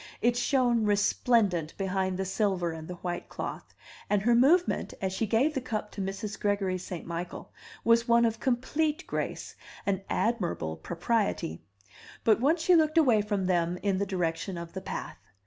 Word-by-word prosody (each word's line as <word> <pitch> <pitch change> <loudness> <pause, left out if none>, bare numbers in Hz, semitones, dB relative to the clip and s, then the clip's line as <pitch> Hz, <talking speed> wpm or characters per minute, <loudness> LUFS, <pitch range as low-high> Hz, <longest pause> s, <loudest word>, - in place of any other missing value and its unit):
It 240 +1 +2
shone 245 -2 +2
resplendent 205 -4 +2
behind 190 -1 -1
the 190 - -2
silver 190 -3 0
and 160 -1 -8
the 180 - -6
white 175 -1 -3
cloth, - - -6 0.3
and 205 -1 +2
her 240 +2 +4
movement, 300 +10 +3
as 190 -1 -2
she 220 +3 -1
gave 245 +9 +2
the 265 - -2
cup 215 -4 -4
to 200 - -5
Mrs. 195 +2 -4
Gregory 200 -3 0
St. 180 -1 -7
Michael, 170 +1 -6 0.3
was 230 +1 +4
one 235 0 +5
of 225 -1 0
complete 290 +5 0
grace - - -4 0.3
and 195 -1 0
admirable 180 - -1
propriety. 175 - -1 0.6
But 220 -1 +4
once 315 +6 +2
she 365 - +5
looked 315 -1 +3
away 245 -9 +5
from 205 -2 -1
them 175 -1 +1
in 195 -2 +1
the 200 - -1
direction 175 0 -2
of 170 0 -7
the 190 - -5
path. - - -6
205 Hz, 170 wpm, -29 LUFS, 185-235 Hz, 0.6 s, one